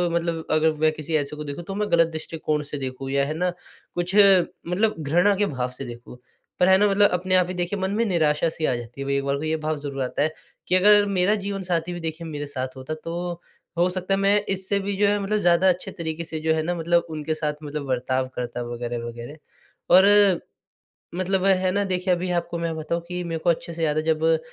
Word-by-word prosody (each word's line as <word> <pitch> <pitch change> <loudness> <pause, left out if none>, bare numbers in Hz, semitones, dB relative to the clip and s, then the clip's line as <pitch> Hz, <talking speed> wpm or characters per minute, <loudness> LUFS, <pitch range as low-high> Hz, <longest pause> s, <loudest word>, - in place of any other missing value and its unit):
मतलब 165 -1 -1
अगर 155 +1 +3
मैं 155 0 +4
किसी 155 +1 -4
ऐसे 145 +1 -3
को 150 - -6
देखूँ 145 +4 -6
तो 195 +3 -6
मैं 210 0 -2
गलत 165 -1 +5
दृष्टिकोण 155 -1 -3
से 145 0 -5
देखूँ 135 0 -5
या 140 0 +2
है 155 - -3
ना, 180 +1 +1 0.5
कुछ 175 +3 -2
मतलब 195 +1 +4
घृणा 175 +7 +3
के 205 +1 +1
भाव 130 -6 -2
से 135 - -5
देखूँ 120 +1 -10 0.4
पर 180 - +4
है 190 0 +6
ना 205 +1 +4
मतलब 205 +1 +4
अपने 185 +1 +1
आप 180 -1 +4
ही 185 - -4
देखिए 180 +3 -2
मन 190 +1 -1
में 230 - +2
निराशा 160 -4 +2
सी 160 0 -3
आ 130 - +2
जाती 120 +3 -8
है - - -3
भई 140 - +1
एक 140 - -1
बार 140 0 +1
को 150 - -6
ये 160 0 0
भाव 155 0 -1
ज़रूर 140 -2 -5
आता 125 - -2
है 155 - +1 0.4
कि, 185 - +3
अगर 205 +2 +6
मेरा 200 +1 +2
जीवनसाथी 180 -4 -2
भी 175 - -5
देखिए 165 0 -5
मेरे 145 -1 -5
साथ 130 -2 -5
होता, 130 +4 -5
तो 170 +2 -5 0.4
हो 175 +1 +3
सकता 185 +1 -2
है 195 - +1
मैं 200 +1 +3
इससे 195 +1 0
भी 200 0 -3
जो 205 0 +3
है 205 0 +2
मतलब 210 +2 0
ज़्यादा 175 0 +4
अच्छे 180 0 -1
तरीके 165 -2 -4
से 160 -1 -5
जो 160 0 +1
है 160 -1 0
ना 175 +2 -1
मतलब 170 +1 +1
उनके 155 0 -3
साथ 150 -1 -1
मतलब 145 -1 -5
बर्ताव 130 0 -1
करता 120 0 -4
वग़ैरह-वग़ैरह। 120 +2 -6 0.6
और 200 -1 +6 0.8
मतलब 185 +1 0
है 185 -1 +3
ना 200 +1 +1
देखिए 185 -1 0
अभी 180 +1 -2
आपको 170 0 -6
मैं 165 -1 -2
बताऊँ 170 +2 -3
कि 180 0 -4
मेरे 165 -1 -3
को 175 - 0
अच्छे 170 0 -1
से 165 0 -4
याद 150 -1 +1
है, 155 - +1
जब 160 0 +2
170 Hz, 235 wpm, -24 LUFS, 150-185 Hz, 0.8 s, है